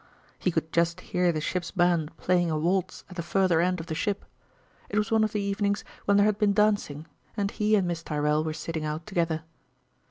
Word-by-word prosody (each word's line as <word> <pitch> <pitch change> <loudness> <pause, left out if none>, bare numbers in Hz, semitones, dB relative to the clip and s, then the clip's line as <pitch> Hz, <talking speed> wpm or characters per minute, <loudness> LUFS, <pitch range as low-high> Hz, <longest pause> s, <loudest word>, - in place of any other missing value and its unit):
He - - +1
could 160 -2 -2
just 170 +1 +2
hear 180 -1 +1
the 155 - -2
ship's 170 +3 -2
band 175 -4 +1
playing 175 -1 +2
a 155 - 0
waltz 180 +4 -1
at 180 - -12
the - - -1
further 180 -1 +2
end 180 0 +1
of 165 - -6
the 160 - -4
ship; 200 +5 -2 0.6
it 205 - -2
was 210 +1 +1
one 220 -1 +4
of 215 - +2
the 215 - -2
52 - - 0
evenings 200 0 0 0.2
when 200 0 +4
there 205 - +5
had 210 -1 +1
been 205 -2 +3
dancing, 205 -8 +1 0.3
and 200 -1 0
he 215 0 +2
and 190 -4 +2
Miss 170 -1 -2
Tyrrell 150 -1 0
were 160 - -2
sitting 160 0 -4
out 155 +2 -3
together. 165 -5 -1
180 Hz, 225 wpm, -27 LUFS, 160-200 Hz, 0.6 s, there